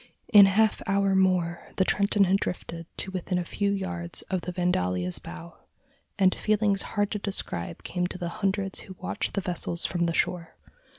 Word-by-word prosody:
In 200 -2 +10
a - - +3
half 215 +2 +2
hour 195 0 +2
more, 180 -3 +1
the 190 - +2
Trenton 200 +1 +2
had 190 +1 +3
drifted 170 -3 -5
to 190 - -4
within 185 0 -2
a 175 - -2
few 200 +3 -1
yards 185 -3 -3
of 185 -2 0
the 180 - -5
Vandalia's 90 - 0
bow, 85 0 -10 0.6
and 190 -2 +4
feelings 210 -2 +2 0.2
hard 205 0 +1
to 210 - -2
describe 85 - -3
came 180 0 -2
to 185 - -7
the 175 -2 -4
hundreds 195 -1 0
who 190 - -10
watched 185 - -3
the 200 - 0
vessels 175 -1 +1
from 175 -1 0
the 170 - 0
shore. 170 -2 0
185 Hz, 185 wpm, -27 LUFS, 170-200 Hz, 0.6 s, In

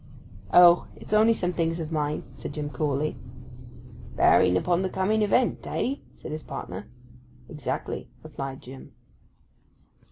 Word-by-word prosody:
'Oh—it's 175 +3 +5
only 220 +2 +5
some 180 -3 -1
things 165 0 -1
of 160 -1 -5
mine,' 150 -1 -1
said - - -7
Jim 150 -1 -4
coolly. 145 +2 -1 1.0
'Bearing 90 0 +5
upon 175 - +1
the 190 - -1
coming 200 +4 +1
event—eh?' 250 +4 0 0.2
said - - -9
his 155 +1 -4
partner. 95 -5 -7 0.6
'Exactly,' 150 +1 -4
replied 135 -1 -7
Jim. 130 +1 -11
160 Hz, 120 wpm, -26 LUFS, 145-190 Hz, 1.0 s, Oh—it's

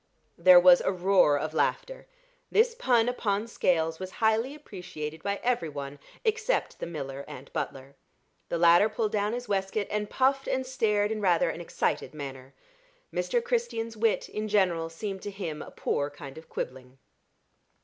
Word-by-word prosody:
There 180 +1 +9
was 175 0 +7
a - - +1
roar 185 -5 +4
of 155 +2 -3
laughter. - - -1 0.4
This 465 +2 +4
pun 245 - +2
upon 215 -4 -1
Scales 165 -7 0
was 185 0 -6
highly 225 +5 +1
appreciated 180 - -7
by 200 +2 -2
every 235 -10 0
one 140 -1 -7 0.3
except 440 +2 0
the - - -4
miller 140 -4 -6
and - - -11
butler. 135 +1 -5 0.6
The 170 - -1
latter 170 +5 +6
pulled 215 0 -1
down 210 +1 0
his 245 0 -4
waistcoat, 200 +1 -1
and 210 0 -2
puffed 270 +1 +1
and 260 0 -1
stared 215 -5 +1
in 215 -1 -2
rather 180 -4 +3
an 175 - -7
excited 155 -4 -2
manner. 135 -2 -8 0.6
Mr. 480 -1 0
Christian's 465 - -2
wit, 220 0 +1
in 215 0 -4
general, 180 -6 +1
seemed 190 +3 -5
to - - -5
him 175 -7 -5
a - - -8
poor 145 0 -2
kind 140 -2 -10
of 160 - -12
quibbling. 130 0 -6
195 Hz, 165 wpm, -28 LUFS, 160-225 Hz, 0.6 s, There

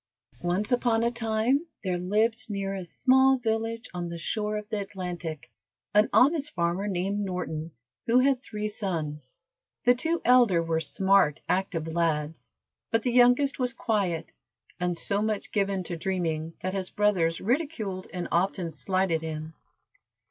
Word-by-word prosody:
Once 180 +6 0
upon 240 -2 +2
a 235 - +2
time 235 +6 0 0.2
there 180 -2 -1
lived 220 +5 0
near 195 -1 -2
a 190 -1 -4
small 265 +8 +4
village 225 0 -2
on 175 -1 -4
the 170 - -5
shore 210 +5 -2
of 210 0 -6
the 215 -2 -1
Atlantic, 175 -6 -6 0.4
an 210 +1 +5
honest 295 +2 +3
farmer 175 +3 0
named 195 +1 -1
Norton, 180 -5 -3 0.4
who 235 +2 +4
had 260 0 +3
three 210 -3 -4
sons. 160 -10 -4 0.5
The 245 - +7
two 325 +7 -1
elder 240 -9 +5
were 165 -1 0
smart, 160 +1 +2
active 180 -4 -1
lads, 155 -6 -1 0.4
but 225 0 +1
the 250 - +1
youngest 245 +3 +4
was 250 -2 0
quiet, 200 -9 -1 0.5
and 175 -1 -1
so 200 +4 -1
much 215 -1 -2
given 195 -2 0
to 175 -1 -5
dreaming 165 -3 -2
that 185 0 -2
his 190 -2 -3
brothers 180 -6 +1
ridiculed 225 - -2
and 180 -1 -4
often 175 -1 0
slighted 185 0 0
him. 160 0 -5
195 Hz, 150 wpm, -27 LUFS, 170-225 Hz, 0.5 s, The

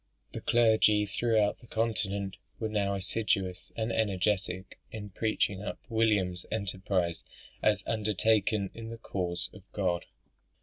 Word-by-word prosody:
The - - -5
clergy 110 -3 +4
throughout 110 0 +2
the 120 - -16
continent 100 -4 -1 0.2
were 110 - -1
now 100 -2 +1
assiduous 95 -2 -1
and 110 0 -1
energetic 95 -3 0
in 105 -2 -6
preaching 105 -2 0
up 105 - -4
William's 105 -6 +2
enterprise 95 -4 -1 0.4
as 105 -3 +3
undertaken 110 -1 +2
in 115 0 -7
the 115 - -6
cause 90 -5 -2
of 105 - -12
God. 90 -4 0
105 Hz, 125 wpm, -30 LUFS, 95-110 Hz, 0.4 s, clergy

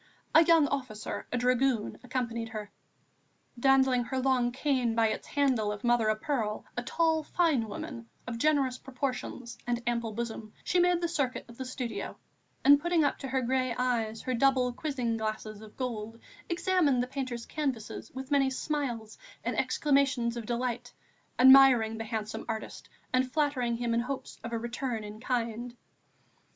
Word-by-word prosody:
A 320 - +8
young 325 -3 +5
officer, 255 -6 -4
a 250 - 0
dragoon, 250 -2 +1
accompanied 235 -3 -3
her. 210 -2 -6 0.9
Dandling 265 -1 +4
her 265 - -3
long 255 -2 +2
cane 255 -3 0
by 225 -1 +3
its - - -4
handle 255 -7 +1
of 210 0 -6
mother 240 -2 +3
o' 215 - +3
pearl, 215 -3 -2
a 245 - -1
tall, 320 +5 +1
fine 305 -7 +1
woman, 235 -1 -7 0.2
of 235 -2 -5
generous 275 -3 +2
proportions 250 -3 -4
and 240 0 -1
ample 235 -2 -1
bosom, 225 -1 -5
she 360 - +2
made 355 0 +3
the 340 - +1
circuit 280 -6 -1
of 235 +1 -14
the 260 - -3
studio, 250 -2 -5 0.5
and 285 +1 +8
putting 345 0 +2
up 285 - 0
to 270 - -5
her 260 0 0
grey 255 0 0
eyes 230 -3 -1
her 255 - -1
double 255 0 +3
quizzing 250 -5 -2
glasses 215 -1 -4
of 215 -1 -13
gold, 230 -3 -4 0.3
examined 340 -7 +2
the - - -1
painter's 255 -3 -4
canvases 260 -7 -4
with 265 +2 -7
many 275 -2 +4
smiles 255 -6 -3 0.2
and - - -1
exclamations 275 -5 +2
of 235 -2 -6
delight, 245 0 -3 0.4
admiring 255 -4 +7
the 225 - -4
handsome 220 0 -4
artist 220 -1 -5 0.2
and 255 0 +2
flattering 260 -6 +1
him 235 -1 -1
in 230 - +2
hopes 260 +3 -5
of 230 - -5
a 230 - -1
return 240 0 -3
in 210 +1 -8
kind. 240 0 -2
250 Hz, 165 wpm, -30 LUFS, 230-270 Hz, 0.9 s, A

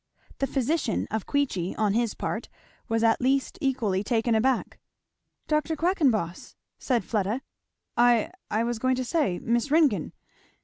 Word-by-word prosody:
The 275 - +1
physician 275 -2 0
of 220 -1 -2
Queechy 250 -11 -1
on 210 -2 +2
his 230 0 0
part - - -4 0.4
was 225 0 +1
at 225 -1 +3
least 265 +2 +1
equally 230 -9 0
taken 230 +1 +1
aback. 245 +3 +1 0.7
"Dr. 305 +1 +1
Quackenboss!" 280 - 0 0.2
said 245 -4 0
Fleda. 215 +4 -1 0.5
"I 240 -2 +4 0.2
I 220 +2 +1
was 235 -1 -2
going 255 +2 +2
to 255 0 -2
say, 245 - +1
Miss 235 +7 0
Ringgan!" 285 - +2
240 Hz, 140 wpm, -26 LUFS, 220-275 Hz, 0.7 s, I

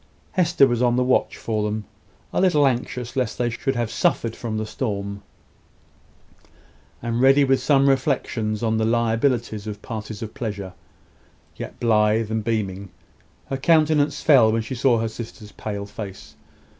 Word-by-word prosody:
Hester 175 -7 +4
was 120 -2 0
on 120 -1 +3
the 125 - +2
watch 125 0 +1
for 110 -2 -2
them 105 0 -2 0.5
a - - +1
little 175 -6 +4
anxious 125 -1 -2
lest 125 -5 -1
they 120 -1 0
should 135 +3 -2
have 120 -2 -1
suffered 115 -1 0
from 110 -2 -4
the 110 - -2
storm, 100 -3 -4 1.8
and 120 0 -1
ready 135 +2 +6
with 135 -1 +2
some 140 -2 +3
reflections 125 -5 0
on 110 -1 +1
the - - +1
liabilities 115 -1 0
of 105 -1 -7
parties 110 -2 -6
of 110 - -7
pleasure; 100 -5 -5 0.8
but - - -29
yet - - -7
blithe 110 -1 +2
and 110 -1 -1
beaming. 100 -4 -2 0.6
Her 135 - 0
countenance 155 0 +2
fell 125 -8 +6
when 115 0 0
she 115 - -6
saw 125 -1 +3
her 115 0 0
sister's 110 -1 -9
pale 100 -2 -5
face. 95 -8 -9
115 Hz, 160 wpm, -23 LUFS, 110-130 Hz, 1.8 s, ready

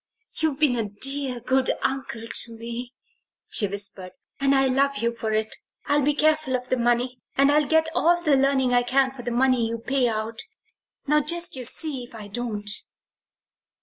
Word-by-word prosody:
"You've 315 -4 0
been 295 -5 +3
a 220 -3 -2
dear, 265 +4 +1
good 260 +2 +1
uncle 265 -4 -2
to 230 0 -3
me," 235 +2 -6 0.6
she 205 - +1
whispered, 195 -2 -3 0.3
"and 275 0 +3
I 270 0 +4
love 275 +2 +1
you 235 +2 0
for 225 -1 -4
it. 215 0 -1 0.3
I'll 290 0 +2
be 290 +1 +1
careful 310 -3 +2
of 250 0 -4
the 255 - +1
money, 240 +1 0 0.2
and 275 +1 +5
I'll 295 -1 +3
get 320 0 +3
all 345 +1 +3
the 305 -5 +3
learning 265 -2 +2
I 245 - +4
can 260 +2 +2
for 265 -2 -9
the 245 - -4
money 245 -1 +2
you 230 +1 -3
pay 255 +2 0
out 225 0 -3 0.7
now 300 +1 +3
just 340 +3 -1
you 255 -2 -6
see 280 0 0
if 240 - -16
I 210 -2 -9
don't!" 210 -2 -4
255 Hz, 185 wpm, -24 LUFS, 230-275 Hz, 0.7 s, and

